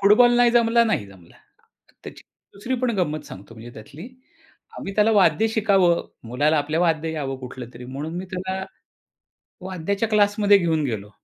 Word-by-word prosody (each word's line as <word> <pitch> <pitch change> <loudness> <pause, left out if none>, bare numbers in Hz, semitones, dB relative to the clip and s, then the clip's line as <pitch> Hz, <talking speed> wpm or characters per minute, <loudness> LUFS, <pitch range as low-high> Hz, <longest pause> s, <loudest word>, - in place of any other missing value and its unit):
Football 230 +5 +5
नाही 245 -1 +4
जमला, 235 0 +3
नाही 210 - -1
जमला. 95 -4 -18 0.7
त्याची - - -11 0.3
दुसरी 235 +6 -3
पण 250 - +1
गंमत 155 -4 -2
सांगतो 100 +4 -12
म्हणजे 115 +2 -11
त्यातली. 140 - -11 0.7
आम्ही 195 - -6
त्याला 215 +1 +3
वाद्य 200 0 +3
शिकावं, 200 -6 +2 0.3
मुलाला 145 +6 +1
आपल्या 150 +3 -1
वाद्य 165 -2 0
यावं 135 -4 -4
कुठलं 125 -1 -8
तरी, 125 +1 -10
म्हणून 145 +5 -6
मी 185 - -5
त्याला, 190 +1 -4 1.0
वाद्याच्या 195 +4 -3
क्लासमध्ये 205 -1 +4
घेऊन 165 -4 0
गेलो. 105 -4 -4
175 Hz, 155 wpm, -22 LUFS, 140-210 Hz, 1.0 s, Football